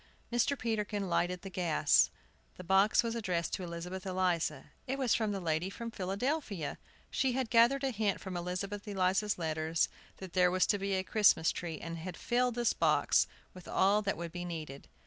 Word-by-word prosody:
Mr. 240 +4 +2
Peterkin 210 -4 -2
lighted 180 0 0
the 195 - -6
gas. 170 -5 +3 0.5
The 185 - -8
box 195 +5 +4
was 230 -1 -2
addressed 180 -7 -2
to 185 - -2
Elizabeth 175 +2 -6
Eliza. 180 -6 -1 0.2
It 265 +2 -1
was 260 -4 +2
from 220 -2 +1
the 200 - -2
lady 165 +1 -1
from 230 +3 -6
Philadelphia! 200 - -2 0.3
She 265 -2 +1
had 255 -2 -2
gathered 240 +4 +5
a 270 - +1
hint 210 -3 0
from 190 -2 -6
Elizabeth 190 +4 -4
Eliza's 195 +1 +1
letters 160 -1 0 0.3
that 190 -2 -9
there 180 -1 +4
was 185 +1 +3
to 205 - +1
be 195 0 -1
a 190 - 0
Christmas 200 -5 +4
tree, 165 -3 -5
and 165 0 -6
had 175 +1 -6
filled 245 0 +1
this 240 -1 +2
box - - +3 0.3
with 180 -2 -12
all 200 +2 +3
that 200 -1 -1
would 170 0 -5
be 175 +1 -5
needed. 155 -5 -7
190 Hz, 185 wpm, -32 LUFS, 175-220 Hz, 0.5 s, gathered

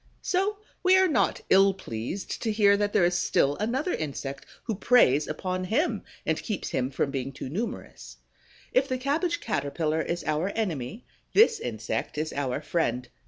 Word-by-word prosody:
So 390 +3 0 0.2
we 370 0 +5
are 375 0 +5
not 310 - +1
ill 195 0 +6
pleased 125 - -5
to 225 - 0
hear 205 -2 +5
that 205 0 0
there 175 - +4
is 175 - +2
still 145 -4 +2
another 260 - -1
insect 140 -2 -4 0.2
who 225 - -2
preys 185 - +4
upon 185 +4 -3
him 275 - 0 0.2
and - - 0
keeps 210 -4 -3
him 130 0 -1
from 140 0 -1
being 135 -1 -3
too 135 -1 -7
numerous. 210 - -5 0.6
If 260 +2 +3
the 255 -1 -1
Cabbage 315 +7 0
caterpillar 155 -3 -1
is 170 +2 -3
our 155 +5 0
enemy, 190 - -3 0.3
this 450 +1 +6
insect 455 - -3
is 155 +1 -2
our 140 0 -2
friend. 125 -6 -1
190 Hz, 165 wpm, -27 LUFS, -, 0.6 s, ill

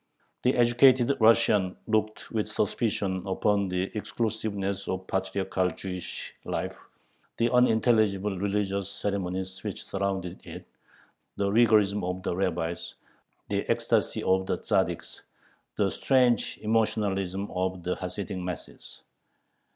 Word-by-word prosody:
The 125 - +2
educated 125 +2 +5
Russian 110 -4 +4
looked 110 -1 -1
with 110 -2 -1
suspicion 100 -3 -1
upon 100 +1 +1
the 90 +3 -2
exclusiveness 105 -3 -2
of 95 0 -3
patriarchal 95 -1 -1
Jewish 90 0 -6
life, - - -3 0.6
the 115 0 +2
unintelligible 110 -5 +3
religious 100 -1 -1
ceremonies 95 -1 -3
which 105 -2 -5
surrounded 95 -2 -3
it, - - -9 0.7
the 100 0 +1
rigorism 105 -3 +4
of 90 +1 -3
the 85 - -1
rabbis, 85 -3 -2 0.5
the - - 0
ecstasy - - +1
of 95 0 +2
the - - 0
Tzaddiks, - - -1 0.6
the - - +2
strange 125 -3 +2
emotionalism 100 -3 0
of 95 -1 -2
the 90 - -1
Hasidic 95 +1 -5
masses. 90 0 -8
100 Hz, 110 wpm, -28 LUFS, 95-110 Hz, 0.7 s, educated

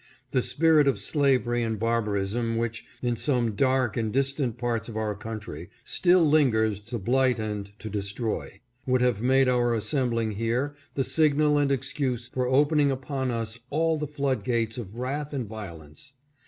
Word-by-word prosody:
The 130 - +2
spirit 155 +1 +3
of 135 - +2
slavery 130 -5 +1
and 110 -1 -1
barbarism 115 0 0
which, 115 0 -3 0.2
in 120 -1 +1
some 120 -2 0
dark 130 +1 +1
and 110 -2 -1
distant 135 -2 0
parts 120 -2 -2
of 110 - -6
our 110 -1 -1
country, 105 -6 -7
still 175 -2 +3
lingers 110 -9 +3
to 115 +4 -6
blight 125 +4 +2
and 105 -2 -4
to 110 - -8
destroy, 105 +2 -3 0.3
would 130 -1 +2
have 125 -4 +2
made 130 +2 +4
our 120 -2 +2
assembling 115 0 0
here 115 +7 -1 0.2
the 135 - +1
signal 150 0 +3
and 140 -1 +2
excuse 130 -2 -1
for 125 0 -2
open 145 +4 +3
ing 145 -1 +4
upon 130 0 -2
us 115 -1 -3
all 160 +2 +1
the 150 - -2
flood 140 -2 -1
gates 115 -2 -1
of 110 -1 -8
wrath 145 +4 -3
and 130 -4 -2
violence. 90 - -10
120 Hz, 170 wpm, -26 LUFS, 110-135 Hz, 0.3 s, made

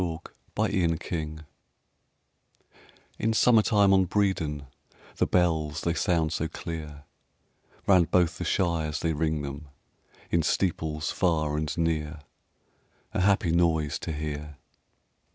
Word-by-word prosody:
XXI 80 -3 -2 0.4
BREDON 85 -3 +1
HILL 80 -3 -3
(1) 80 0 -12 1.7
In 110 0 +1
summertime 110 -4 +4
on 95 -1 +4
Bredon 85 -8 0 0.5
The - - +2
bells 80 -4 +1
they 85 - 0
sound 85 -2 +1
so 80 - -1
clear; 80 -3 -7 0.8
Round 90 -4 +4
both 90 -1 +2
the - - -2
shires 80 -4 0
they 80 -1 0
ring 80 -1 -1
them 70 +2 -7 0.6
In 85 - +3
steeples 80 -2 -1
far 80 -4 +1
and 75 +1 -2
near, 80 -2 -1 0.9
A - - 0
happy 95 -3 +3
noise 80 -4 +1
to - - -4
hear. 75 -1 -5
80 Hz, 120 wpm, -27 LUFS, 75-90 Hz, 1.7 s, summertime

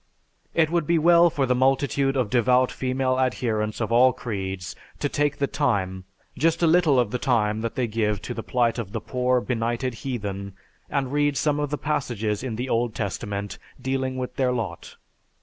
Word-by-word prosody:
It 160 -1 +3
would 170 -3 0
be 170 - +3
well 170 +2 +6
for 145 -4 0
the 125 - +2
multitude 135 +1 +2
of 120 -6 0
devout 125 +1 +3
female 130 0 -1
adherents 110 -4 -1
of 115 -1 -2
all 125 +2 +5
creeds 95 -7 -5 0.2
to 145 - -1
take 145 0 0
the 140 - +1
time, 95 -11 -1 0.3
just 165 +2 +1
a - - +6
little 160 -5 +4
of 120 -4 +1
the 125 - -2
time 110 -4 +1
they 115 +2 -1
give 105 -2 0
to 125 - -4
the 115 - -5
plight 120 0 0
of 105 -3 -5
the 115 - -1
poor, 125 +2 +1
benighted 120 +1 -1
heathen 100 -6 -4 0.4
and 140 -2 -1
read 145 -1 +2
some 150 -1 +1
of 145 -1 -1
the 150 - -2
passages 115 -9 -2
in 125 -3 -4
the 125 +3 -3
Old 115 -2 0
Testament 100 0 -4 0.2
dealing 130 0 -2
with 125 -1 -5
their 130 -2 +2
lot. 110 -9 -4
125 Hz, 185 wpm, -24 LUFS, 110-135 Hz, 0.4 s, well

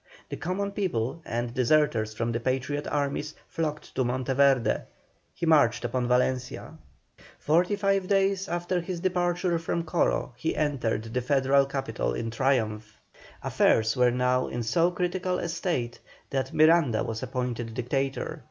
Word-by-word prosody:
The - - -4
common 200 +3 -2
people, 165 - -2
and 120 0 -3
deserters 120 -4 +2
from 115 +1 -1
the 115 - -1
Patriot 135 +4 -2
armies, 145 +1 -2
flocked 155 -2 -4
to 130 - +1
Monteverde; 130 -1 +2 0.5
he - - -3
marched 120 -7 +4
upon 125 0 -1
Valencia. 125 +3 0 0.6
Forty 175 +6 +2
five 195 -2 +1
days 195 0 +2
after 175 +1 -1
his 175 0 -5
departure 175 -1 0
from 165 +1 -2
Coro 165 -6 0
he 160 - -2
entered 140 -8 0
the 115 +3 -3
Federal 135 +1 +3
capital 135 - -2
in 115 - -3
triumph. 110 -5 -1 0.5
Affairs 110 +2 +2
were 125 -1 +4
now 125 +1 +1
in 120 - -3
so 165 +10 +2
critical 180 +1 -1
a 170 - -3
state 165 -8 -2 0.3
that 135 -1 -1
Miranda 155 -7 +4
was 110 0 -4
appointed 120 -3 -3
Dictator. 135 +3 -2
135 Hz, 145 wpm, -27 LUFS, 120-170 Hz, 0.6 s, marched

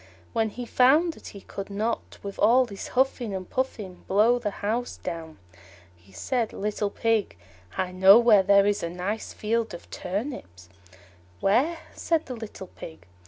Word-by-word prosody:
When 225 -2 +1
he 245 +4 -7
found 295 +9 +4
that - - -13
he 200 - -10
could 195 +1 -7
not, 215 +3 -3
with 200 -1 -7
all 245 +5 +5
his 200 -5 -8
huffing 250 -5 +1
and 185 -1 -6
puffing, 215 -8 -4
blow 220 +5 +4
the 220 -3 -2 0.2
house 235 +4 -2
down, 160 -2 -6 0.6
he 90 +3 -23
said, 230 - -2
"Little 210 0 -2
Pig, 225 - 0 0.4
I 185 -1 -1
know 190 +3 +8
where 230 -4 +6
there 200 +1 +5
is 205 0 +1
a 170 - -3
nice 185 +5 -4
field 225 0 -2
of 170 - -12
turnips." 180 - -5 0.7
"Where?" 270 +12 +2 0.2
said 325 -2 0
the 255 - -6
little 220 -4 -8
Pig. 160 - -12
210 Hz, 165 wpm, -26 LUFS, 190-240 Hz, 0.7 s, know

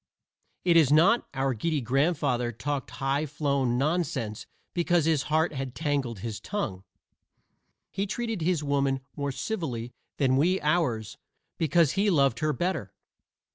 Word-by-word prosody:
It 170 -2 +5
is 150 -4 +5
not; 185 +10 +5
our 135 0 +1
giddy 150 +7 -1
grandfather 135 -1 +1
talked 140 +4 -3
high 140 +2 -1
flown 140 -4 0
nonsense 135 -7 -1 0.3
because 175 -2 +2
his 160 -4 +2
heart 155 0 +2
had 135 -2 -5
tangled 140 - -2
his 110 -1 -4
tongue. 110 - -4 1.1
He 200 +1 -2
treated 225 -1 -3
his 165 -2 +1
woman 140 -2 +1
more 140 -1 -2
civilly 130 - -4 0.2
than 130 -2 +3
we 180 +7 +3
ours 125 -9 0 0.4
because 160 -2 +3
he 205 +2 +2
loved 140 - +3
her 155 0 +1
better. 175 - -2
145 Hz, 135 wpm, -27 LUFS, 130-170 Hz, 1.1 s, It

